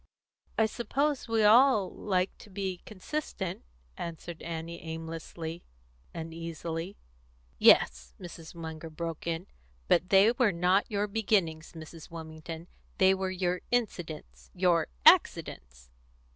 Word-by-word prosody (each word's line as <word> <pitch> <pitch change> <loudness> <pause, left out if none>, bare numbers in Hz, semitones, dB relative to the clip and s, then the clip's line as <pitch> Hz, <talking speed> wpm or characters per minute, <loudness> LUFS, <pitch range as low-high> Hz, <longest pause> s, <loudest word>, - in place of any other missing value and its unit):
"I 220 - +5
suppose 270 +5 -1
we 225 -1 +2
all 220 -1 +6
like 185 -2 -1
to - - -13
be 190 -2 -4
consistent," 195 - -4 0.3
answered 170 0 -7
Annie 165 0 -6
aimlessly, 165 +1 -6 0.5
uneasily. 165 +2 -5 0.6
"Yes," - - +5
Mrs. 170 -1 -10
Munger 160 -1 -7
broke 165 +1 -5
in; 165 +2 -2 0.4
"but 175 +2 +3
they 200 +3 +6
were 240 -3 +2
not 180 +3 +2
your 205 -1 0
beginnings, 195 -7 0
Mrs. 160 0 -10
Wilmington; 160 0 -8 0.3
they 190 0 +5
were 190 0 -2
your 180 -1 -1
incidents 180 -10 -3
your 180 -2 +3 0.2
accidents." 60 -1 +3
175 Hz, 115 wpm, -30 LUFS, 160-200 Hz, 0.6 s, all